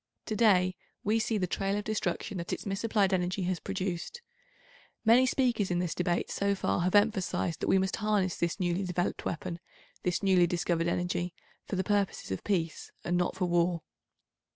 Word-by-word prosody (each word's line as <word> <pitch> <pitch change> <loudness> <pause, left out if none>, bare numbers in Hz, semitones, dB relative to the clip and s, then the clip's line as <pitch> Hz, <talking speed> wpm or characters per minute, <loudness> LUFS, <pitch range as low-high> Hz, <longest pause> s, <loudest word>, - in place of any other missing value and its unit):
To 215 - -2
day 185 -5 +4 0.3
we 215 +2 +2
see 220 0 0
the 185 - +1
trail 195 +3 -1
of 205 - -2
destruction 200 -3 -2
that 170 - -5
its - - -3
misapplied 200 0 +1
energy 185 +1 0
has 180 -1 -1
produced. 195 - -4 0.8
Many 245 +4 +6
speakers 245 -7 +1
in 175 - +1
this 175 -2 -1
Debate 175 -1 -1
so 200 0 +1
far 190 - 0
have 180 +3 +1
emphasised 205 -5 +2
that - - -2
we - - +5
must 190 0 0
harness 210 -4 +1
this 170 +4 -1
newly 180 +1 0
developed 180 -1 -2
weapon, 170 +1 -3 0.4
this 180 +2 -1
newly 185 -3 +5
discovered 170 -1 0
energy, 175 0 -1 0.3
for - - -2
the 190 - 0
purposes 200 - 0
of 95 - -3
peace 170 -5 -1
and 175 - 0
not 175 0 +1
for 185 -1 0
war. 175 -1 +1
185 Hz, 180 wpm, -30 LUFS, 175-205 Hz, 0.8 s, Many